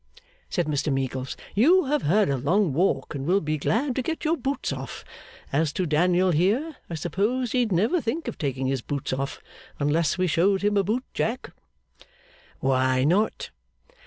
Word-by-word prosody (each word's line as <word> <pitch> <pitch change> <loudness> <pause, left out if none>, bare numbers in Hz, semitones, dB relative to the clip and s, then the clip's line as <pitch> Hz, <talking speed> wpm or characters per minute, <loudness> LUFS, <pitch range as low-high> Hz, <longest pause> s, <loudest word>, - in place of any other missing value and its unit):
said 175 - 0
Mr 150 0 -1
Meagles. 130 -1 -2 0.2
'You 320 - +5
have 295 +1 +1
had 195 +7 +3
a 140 - +1
long 160 +6 +1
walk, 175 +4 0
and 140 -2 -4
will 190 +3 +4
be 155 -3 -2
glad 245 - 0
to 260 - 0
get 320 +5 -4
your 320 +2 +3
boots 270 - -2
off. 130 -3 -7 0.5
As 155 +1 +2
to 185 - -1
Daniel 175 +4 +3
here, 220 - +1
I 170 - -4
suppose 210 - -1
he'd 245 -4 +1
never 220 - +2
think 290 +8 -3
of - - -5
taking 135 -3 -2
his 130 -1 0
boots 140 0 -3
off, 135 +1 -4 0.3
unless 150 +3 +1
we 185 - +1
showed 190 +4 +2
him 205 0 +2
a 200 - +4
boot 225 +7 -1
jack.' 240 +4 -2 1.1
'Why 130 -1 +2
not? 190 +9 +1
180 Hz, 175 wpm, -25 LUFS, 145-230 Hz, 1.1 s, You